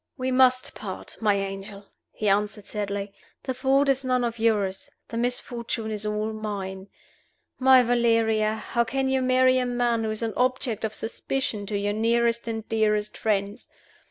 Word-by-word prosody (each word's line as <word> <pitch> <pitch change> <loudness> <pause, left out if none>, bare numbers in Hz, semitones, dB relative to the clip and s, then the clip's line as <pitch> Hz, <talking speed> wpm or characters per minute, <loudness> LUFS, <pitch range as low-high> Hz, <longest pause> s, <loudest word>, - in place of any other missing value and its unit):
"We 260 0 -1
must 255 0 +4
part, - - -6
my 210 -2 +3
angel," 195 +1 -5 0.3
he 215 - -3
answered, 205 +1 +1
sadly. 200 -1 -4 0.3
"The 260 - -2
fault 270 +2 +2
is 275 0 +2
none 255 -1 +1
of 235 -1 -2
yours; 215 +2 0 0.2
the - - -6
misfortune 235 -2 -2
is 210 0 -3
all 210 +1 -2
mine. 195 -3 -5 0.7
My 260 -1 +7
Valeria! 230 -2 +2
how 235 +2 -1
can 265 +3 -1
you 265 0 +1
marry 255 0 +4
a 250 - 0
man 240 -2 +1
who 220 - -1
is 215 +1 -3
an 225 -2 -2
object 250 -3 0
of 220 -1 -2
suspicion 225 -3 -3
to 205 0 -1
your 205 +1 -1
nearest 235 +2 +1
and 225 -1 -4
dearest 210 -1 +1
friends? 205 +1 -1
225 Hz, 165 wpm, -25 LUFS, 210-250 Hz, 0.7 s, My